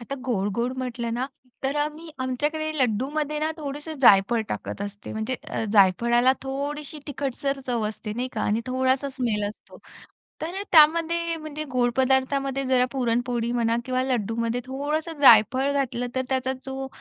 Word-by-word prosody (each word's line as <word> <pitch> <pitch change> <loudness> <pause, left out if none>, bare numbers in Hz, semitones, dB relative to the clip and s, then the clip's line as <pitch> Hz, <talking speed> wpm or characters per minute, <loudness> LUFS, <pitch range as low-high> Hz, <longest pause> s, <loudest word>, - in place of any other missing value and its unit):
आता 255 +4 -5
गोड-गोड 235 +3 0
म्हटलं 240 -2 -3
ना 255 +2 -1 0.4
तर 270 +2 -1
आम्ही 305 +2 -3
आमच्याकडे 295 +5 -1
लड्डूमध्ये 280 +6 0
ना 310 +1 0
थोडंसं 295 +1 -6
जायफळ 215 +2 +6
टाकत - - -5
असते. 205 0 -7
म्हणजे 220 +4 -2
अ, - - -2
जायफळाला 235 +6 +4
थोडीशी 285 +3 -4
तिखटसर 275 0 -3
चव 235 -4 0
असते 215 0 -6
नाही 250 +3 -3
का 215 - -3
आणि 215 +2 +1
थोडासा 260 +2 +1
स्मेल 235 -6 -1
असतो. 210 - -13 0.6
तर 335 +3 -4
अ, - - -2
त्यामध्ये 335 +1 +4
म्हणजे 310 -1 -6
गोड 245 -1 +2
पदार्थामध्ये 270 +1 +1
जरा 255 -1 +3
पुरणपोळी 240 -2 0
म्हणा 230 -1 +1
किंवा 255 0 0
लड्डूमध्ये 230 -1 -1
थोडंसं 300 +4 -3
जायफळ 260 +2 +6
घातलं 250 -3 -1
तर 260 - +1
त्याचा 260 0 0
जो 265 0 -4
260 Hz, 150 wpm, -25 LUFS, 235-285 Hz, 0.6 s, जायफळ